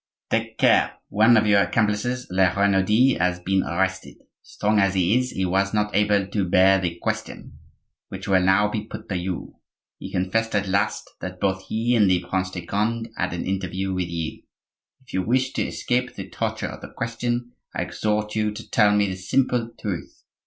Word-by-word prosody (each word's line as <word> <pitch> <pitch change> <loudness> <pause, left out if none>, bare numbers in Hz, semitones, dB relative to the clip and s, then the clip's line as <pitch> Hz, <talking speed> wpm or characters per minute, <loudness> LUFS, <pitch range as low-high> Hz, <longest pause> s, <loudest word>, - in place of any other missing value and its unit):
"Take - - -1
care! - - +3
one 110 +3 +5
of 110 - +3
your 100 -1 +5
accomplices, 115 +4 0
La 95 0 +4
Renaudie, 100 +5 +3
has 90 +1 +1
been 95 +1 +1
arrested. 95 +2 -2 0.3
Strong 105 +1 0
as 100 -1 +2
he 95 +3 +3
is, 125 0 -2
he 95 - -2
was 95 +3 +1
not 105 0 0
able 105 -1 +3
to 100 -2 -2
bear 95 +2 +5
the 85 -2 -2
'question,' - - -4 0.5
which - - -7
will 95 -1 +4
now 95 +3 +4
be 105 0 -3
put 110 - -9
to 95 - -2
you; 90 0 -4 0.4
he - - -8
confessed 110 +5 0
at 100 -1 +1
last 100 +3 0
that 90 0 -7
both 95 0 -1
he 115 +3 0
and 105 -5 +4
the 90 -1 +1
Prince 95 0 -1
de 90 -2 -7
Conde 115 +4 -1
had - - -1
an 85 - -4
interview 95 0 -2
with 90 -1 -2
you. 85 -2 -4 0.6
If 130 - -16
you 95 - +1
wish 130 +6 0
to - - -1
escape 125 0 -1
the 95 -1 -7
torture - - -3
of - - -9
the - - -9
question, 120 +1 -2 0.2
I - - 0
exhort 105 0 -2
you 105 -1 +1
to 110 +2 -10
tell 105 -2 +4
me 105 0 +3
the 95 - -3
simple 115 +5 0
truth. 95 -6 -5
100 Hz, 195 wpm, -23 LUFS, 95-110 Hz, 0.6 s, one